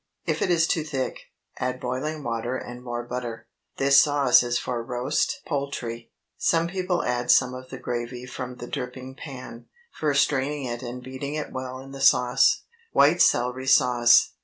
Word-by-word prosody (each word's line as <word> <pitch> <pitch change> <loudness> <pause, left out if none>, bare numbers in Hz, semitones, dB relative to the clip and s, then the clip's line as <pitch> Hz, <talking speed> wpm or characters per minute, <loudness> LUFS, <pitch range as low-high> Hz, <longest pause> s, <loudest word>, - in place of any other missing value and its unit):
If - - -1
it - - +1
is 165 -2 +4
too 160 -1 0
thick, 135 -4 -3 0.4
add 125 0 -2
boiling 140 +5 -3
water 120 +1 -2
and 120 -1 -8
more 120 -1 -4
butter. 120 -2 -5 0.3
This 140 0 +6
sauce 145 -4 +5
is 120 0 0
for 120 -1 -3
roast 125 +4 -1
poultry. 135 -6 -4 0.3
Some 165 0 +2
people 180 0 -1
add 120 0 -1
some 125 -1 +5
of 130 0 -9
the 130 - -7
gravy 120 0 -4
from 125 0 -6
the 120 - -8
dripping 130 0 -6
pan, 130 -4 -9 0.2
first 145 -2 +2
straining 140 +1 -1
it 120 0 -4
and 125 0 -7
beating 130 +3 -5
it 155 - -4
well 130 0 -5
in 135 +1 -11
with 135 - -8
the - - -7
sauce. 130 - +3 0.3
WHITE 155 +5 +5
CELERY 125 +2 +2
SAUCE. 125 -3 +5
130 Hz, 175 wpm, -25 LUFS, 120-140 Hz, 0.4 s, This